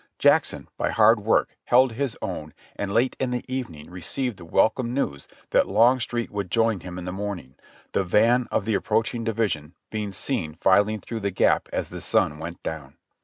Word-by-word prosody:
Jackson - - +3
by - - 0
hard 110 +1 +5
work 105 +2 +1
held 130 +1 +5
his 130 +1 -2
own 75 0 -5 0.2
and 100 -1 -3
late 120 +5 +2
in 130 - 0
the 125 -1 -3
evening 115 - -5
received 105 - -3
the 85 - -11
welcome 120 +8 +2
news 70 - -2 0.2
that - - +4
Longstreet 120 0 +2
would 100 -3 -3
join 115 0 +2
him 90 +1 -8
in 90 - -6
the 90 - -3
morning, 95 -9 -5 0.4
the 100 - +1
van 115 +7 +3
of - - 0
the 110 - 0
ap - - -2
proaching 115 +2 0
division 100 -9 -1 0.2
being 105 -2 -3
seen 95 - -2
filing 100 +4 +3
through 115 - -5
the 100 -1 -1
gap 95 - +2
as - - -2
the - - -7
sun 75 - +1
went 85 +2 -7
down. 75 -5 -6
105 Hz, 190 wpm, -25 LUFS, 90-120 Hz, 0.4 s, hard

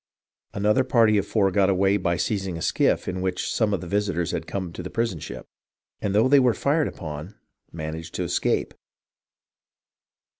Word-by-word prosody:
Another 105 +6 +3
party 115 -5 +4
of - - -3
four 100 -3 +2
got 100 0 +3
away 95 +1 +3
by 85 -3 0
seizing 95 -3 -2
a - - -7
skiff - - +1
in 90 0 -3
which 95 0 -2
some 105 -4 +1
visitors 90 -1 -1
had - - -4
come 95 -4 -4
to - - -6
the 90 - -6
prison 115 -8 -1
ship, 65 -2 -8 0.6
and 100 -1 -1
though 110 +4 +5
they 140 +1 +6
were 125 -3 +3
fired 150 +2 +1
upon, 75 +5 -7 0.4
managed 80 0 -6
to - - -1
escape. - - 0
95 Hz, 165 wpm, -24 LUFS, 85-110 Hz, 0.6 s, they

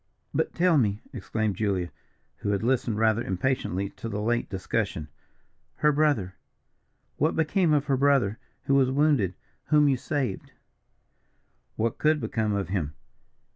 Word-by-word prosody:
"But, 465 - -1
tell 170 -3 +4
me," 105 -4 +1
exclaimed 110 -2 -2
Julia, 95 -5 -1 0.5
who - - -3
had 100 - -1
listened 120 -3 +1
rather 110 +1 +2
impatiently 95 -1 -1
to 115 - -5
the 105 -1 -3
late 120 +3 0
discussion 80 -5 -2 0.7
"her 150 - +3
brother! 145 -11 +1 0.8
what 155 +4 +1
became 165 +2 +2
of 150 -1 +2
her 135 -3 +1
brother 135 -6 +2 0.2
who 140 - +1
was 135 -2 +4
wounded 135 - +2 0.3
whom 150 -1 +4
you 135 -2 +3
saved?" 130 -6 -3 1.2
"What 115 0 -1
could 155 0 +3
become 110 -6 -1
of 100 -4 -2
him? 80 -7 -2
120 Hz, 140 wpm, -27 LUFS, 100-145 Hz, 1.2 s, tell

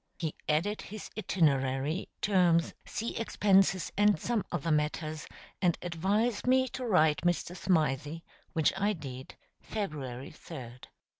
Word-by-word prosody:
He 160 -3 -2 0.2
added 180 +8 +1
his 215 0 -8
itinerary, 150 -4 +1
terms, 175 -5 +3
sea 230 +2 -4
expenses, 195 -4 +3
and 205 -4 +4
some 230 0 0
other 165 -1 -1
matters, 155 0 -1 0.3
and 175 -3 +3
advised 200 +8 0
me 260 0 +4
to 255 0 -5
write 160 -7 +4
Mr. 175 +1 0
Smythe, 155 -4 0 0.3
which 160 -2 +3
I 200 +2 +1
did 135 -6 -8 0.3
February 140 - -5
3d. 125 -6 -10
170 Hz, 125 wpm, -31 LUFS, 150-205 Hz, 0.3 s, and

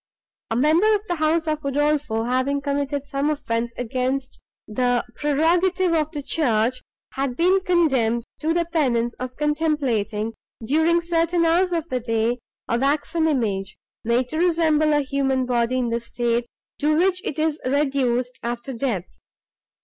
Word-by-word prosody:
A 225 - -1
member 325 - +4
of 415 0 -4
the 350 -4 -2
house 315 +1 +1
of 305 -1 0
Udolpho, 285 -4 0
having 260 +3 +1
committed 280 0 -2
some 280 +1 -1
offence 235 -6 -2
against 255 +2 -2 0.3
the 245 +2 0
prerogative 340 +5 +2
of 310 -2 +1
the 295 -3 -6
church, 250 -5 +1 0.3
had 270 -2 -2
been 365 +6 +3
condemned 265 - +2 0.2
to 315 - 0
the 340 +1 +1
penance 250 -8 0
of 255 0 -5
contemplating, 270 -9 0 0.3
during 320 +6 +3
certain 335 0 +1
hours 355 +3 +3
of 335 -2 -1
the 255 - -1
day, 230 +1 0 0.3
a 235 - 0
waxen 300 +4 +1
image, 210 -9 -1 0.3
made 235 +2 +1
to 315 - -3
resemble 320 -3 +3
a 295 0 +3
human 270 -1 0
body 245 0 +1
in 245 -2 0
the 230 0 0
state, 235 0 -1 0.3
to 305 +1 +2
which 365 +1 +2
it 280 - -4
is 310 0 0
reduced 255 -3 0
after 240 +2 -4
death. 230 -7 -2
280 Hz, 150 wpm, -23 LUFS, 240-320 Hz, 0.3 s, member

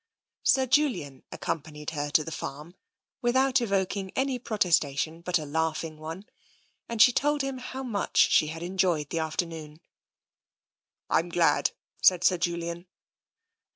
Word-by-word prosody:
Sir 265 -1 +3
Julian 235 - +1
accompanied 150 -1 -5
her 145 -2 -3
to 155 +1 +3
the 165 - -7
farm 150 +3 -7 0.5
without 260 +2 +3
evoking 195 -2 -1
any 265 -1 0
protestation 165 - 0
but 180 +1 +1
a 155 - -5
laughing 160 +1 -2
one, 165 +6 -7 0.6
and 230 -1 -4
she 245 - +8
told 290 +3 +1
him 270 -1 -3
how 260 +1 -6
much 225 -6 -3
she 155 - +5
had 165 +2 -6
enjoyed 175 -5 0
the 165 - -1
afternoon. 160 -1 -4 0.7
" - - -66
I'm 165 +2 +2
glad," 170 -1 +3 0.3
said 180 -1 +5
Sir 180 -2 +3
Julian. 170 +1 -3
170 Hz, 140 wpm, -27 LUFS, 155-230 Hz, 0.7 s, she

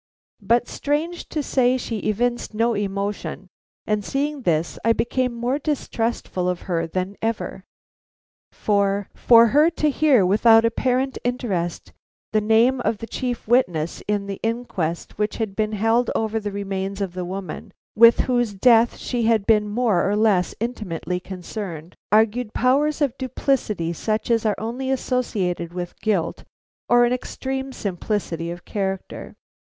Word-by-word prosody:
But 235 +4 +2
strange 315 +4 -2
to 300 - -2
say 255 -1 +2
she 230 -3 -4
evinced 240 +2 -1
no 230 +2 +2
emotion, 200 -1 -3 0.4
and 210 -1 0
seeing 285 +4 -2
this, 165 -6 0
I 230 +1 +4
became 250 +2 0
more 240 +4 -1
distrustful 235 - -2
of 180 -1 -3
her 170 -3 -2
than 185 +4 -3
ever; 220 -4 -3 0.9
for, 200 -1 0
for 230 -1 +6
her 300 +7 +5
to 305 -3 0
hear 270 -9 +4
without 225 +4 +5
apparent 255 +3 0
interest 200 -9 -2 0.4
the 215 - +3
name 230 +4 +3
of 225 - 0
the 225 - -6
chief 245 -1 -4
witness 175 -10 +1
in 205 -1 0
the 200 -1 -5
inquest 220 -8 -3
which 210 0 -1
had 215 -4 -3
been 215 0 -1
held 225 +3 +2
over 220 0 0
the 205 -1 -4
remains 195 0 -4
of 195 -3 -3
the 180 0 -4
woman 190 +3 -6 0.2
with 230 +2 +7
whose 240 -5 0
death 230 +3 +4
she 240 -2 -2
had 220 -3 +2
been 210 -2 +3
more 210 -5 +1
or 205 - +1
less 210 -4 +2
intimately 195 -6 -3
concerned, 180 -2 -7 0.2
argued 220 +2 +2
powers 290 +5 +2
of 275 -4 +1
duplicity 245 -9 -1
such 215 +7 -2
as 230 -1 +2
are 210 - +1
only 245 +4 -4
associated 205 -10 -1
with 175 -1 -6
guilt 200 -7 -1 0.5
or 240 0 +6
an 240 - +1
extreme 265 +1 -4
simplicity 185 -5 -3
of 175 0 -8
character. 195 -2 -4
220 Hz, 150 wpm, -22 LUFS, 195-245 Hz, 0.9 s, with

